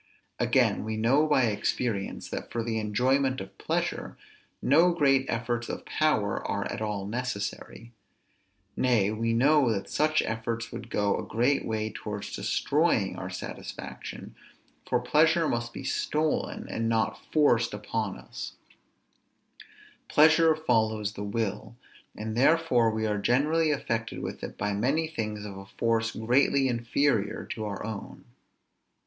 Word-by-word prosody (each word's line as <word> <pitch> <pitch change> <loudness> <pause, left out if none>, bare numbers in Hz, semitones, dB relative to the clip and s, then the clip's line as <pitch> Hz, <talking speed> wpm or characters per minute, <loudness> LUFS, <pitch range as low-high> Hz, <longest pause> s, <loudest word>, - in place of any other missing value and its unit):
Again, - - +2
we 110 0 -3
know 135 +8 +3
by 145 -4 +3
experience, 110 -1 -1
that, - - -5
for 115 - -2
the 110 -1 -1
enjoyment 130 +5 +1
of 95 - -9
pleasure, - - -2 0.4
no 165 +6 +5
great 135 -4 +3
efforts 120 0 -2
of - - -5
power 110 -11 +1
are - - -1
at - - -5
all 105 -2 -2
necessary; 115 0 -4 0.8
nay, 115 -6 +2
we 115 +1 -1
know 135 +2 +4
that 100 -3 -3
such 155 +1 +2
efforts 115 +1 -3
would 115 - -7
go 105 -2 +1
a - - -4
great 125 +5 +1
way 110 -1 -2
towards 105 -1 -6
destroying - - +1
our - - -5
satisfaction: - - -7 0.6
for - - +3
pleasure 160 +6 +3
must 120 0 -2
be - - -8
stolen, 150 +3 -1
and 115 0 -2
not 115 -1 0
forced 120 -7 +3
upon 105 0 -3
us; - - -8 1.5
pleasure 160 +1 +5
follows 110 -8 +1
the 100 - -6
will; 105 +1 -3 0.4
and 110 0 -4
therefore 130 -3 +4
we 110 0 -1
are 105 -1 0
generally 150 +9 +2
affected 115 -6 -2
with - - -6
it - - -6
by 105 0 -1
many 135 +10 +1
things 105 -8 -4
of 100 -2 -7
a 100 - -11
force 115 +1 0
greatly 135 +4 +3
inferior 120 -2 0
to 110 - -5
our 105 -1 -4
own. 110 -3 -7
115 Hz, 140 wpm, -28 LUFS, 110-140 Hz, 1.5 s, no